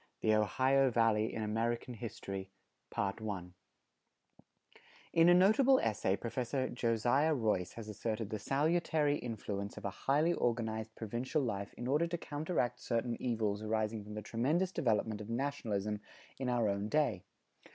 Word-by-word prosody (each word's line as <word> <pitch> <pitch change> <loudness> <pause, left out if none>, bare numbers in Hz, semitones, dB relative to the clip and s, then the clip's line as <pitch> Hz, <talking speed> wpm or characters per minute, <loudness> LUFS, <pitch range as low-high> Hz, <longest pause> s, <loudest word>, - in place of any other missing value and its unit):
_ - - -31 0.2
V - - 0
THE - - +6
OHIO 130 +6 +3
VALLEY 115 -2 +2
IN 110 - -3
AMERICAN 115 +3 -1
HISTORY[157:1] 100 -2 -5 1.6
In 165 +1 +6
a - - +8
notable 220 +9 +6
essay 100 -3 +1
Professor 125 +4 -2
Josiah 120 +6 +2
Royce 105 -7 0
has 115 -2 -8
asserted 110 +1 -3
the 110 - -2
salutary 150 +3 +1
influence 100 -5 -4
of - - -7
a 100 - -1 0.2
highly 155 +5 +4
organized 110 -4 -1
provincial 120 +7 -2
life 100 -4 -3
in 120 - -6
order 150 +6 +2
to 175 +1 -2
counteract 145 -6 -2
certain 115 0 -1
evils 110 -4 0
arising 110 0 -1
from 105 +1 -8
the 105 - -5
tremendous 150 - +1
development 110 - 0
of 105 - -8
nationalism 110 -5 -2 0.4
in 130 -2 -1
our 120 -3 +2
own 100 +1 -1
day. 140 -11 +1
115 Hz, 145 wpm, -34 LUFS, 105-135 Hz, 1.6 s, a